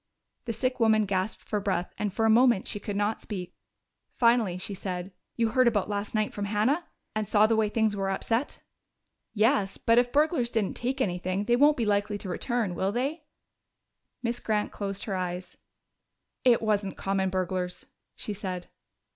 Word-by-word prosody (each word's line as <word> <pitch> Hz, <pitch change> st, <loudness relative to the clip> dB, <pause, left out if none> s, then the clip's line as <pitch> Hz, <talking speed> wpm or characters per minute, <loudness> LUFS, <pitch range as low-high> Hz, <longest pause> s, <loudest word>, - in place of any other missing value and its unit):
The 230 Hz, -, -2 dB
sick 255 Hz, +3 st, -1 dB
woman 220 Hz, -2 st, +4 dB
gasped 190 Hz, +1 st, -2 dB
for 210 Hz, -, -2 dB
breath 190 Hz, -3 st, -2 dB
and 210 Hz, -1 st, -2 dB
for 225 Hz, +4 st, 0 dB
a -, -, +4 dB
moment 235 Hz, -3 st, +4 dB
she 205 Hz, -, -2 dB
could 205 Hz, 0 st, -5 dB
not 205 Hz, +2 st, 0 dB
speak. 180 Hz, -4 st, -6 dB, 0.6 s
Finally 235 Hz, -6 st, +3 dB
she 190 Hz, +2 st, -5 dB
said, 185 Hz, -1 st, -5 dB, 0.2 s
"You 230 Hz, -1 st, +1 dB
heard 255 Hz, +2 st, +4 dB
about 210 Hz, -4 st, +1 dB
last 205 Hz, +2 st, -3 dB
night 215 Hz, 0 st, 0 dB
from 205 Hz, -, -3 dB
Hannah? 220 Hz, +11 st, +1 dB, 0.3 s
And 215 Hz, -1 st, -1 dB
saw 210 Hz, 0 st, +5 dB
the 225 Hz, +1 st, +3 dB
way 220 Hz, -1 st, +2 dB
things 220 Hz, -1 st, +1 dB
were 195 Hz, -1 st, -1 dB
upset?" 230 Hz, +7 st, -1 dB, 0.7 s
"Yes. 215 Hz, -2 st, +2 dB
But 230 Hz, +1 st, +4 dB
if 245 Hz, -, +3 dB
the -, -, -21 dB
burglars 295 Hz, -4 st, +2 dB
didn't 225 Hz, -5 st, -1 dB
take 260 Hz, +3 st, -2 dB
anything, 185 Hz, -1 st, -1 dB
they 240 Hz, +3 st, +3 dB
won't 290 Hz, +4 st, +5 dB
be 235 Hz, -, 0 dB
likely 205 Hz, 0 st, +1 dB
to 200 Hz, -, -7 dB
return, 225 Hz, 0 st, -1 dB
will 190 Hz, +3 st, 0 dB
they?" 280 Hz, +7 st, -2 dB, 1.0 s
Miss 235 Hz, 0 st, -1 dB
Grant 210 Hz, -1 st, -1 dB
closed 200 Hz, -1 st, -4 dB
her 200 Hz, -, -3 dB
eyes. 180 Hz, 0 st, -4 dB, 0.9 s
"It 240 Hz, -3 st, +4 dB
wasn't 205 Hz, -3 st, 0 dB
common 195 Hz, -1 st, 0 dB
burglars," 185 Hz, -1 st, -2 dB, 0.3 s
she 210 Hz, -, -4 dB
said. 185 Hz, -3 st, -5 dB
210 Hz, 180 wpm, -28 LUFS, 195-235 Hz, 1.0 s, saw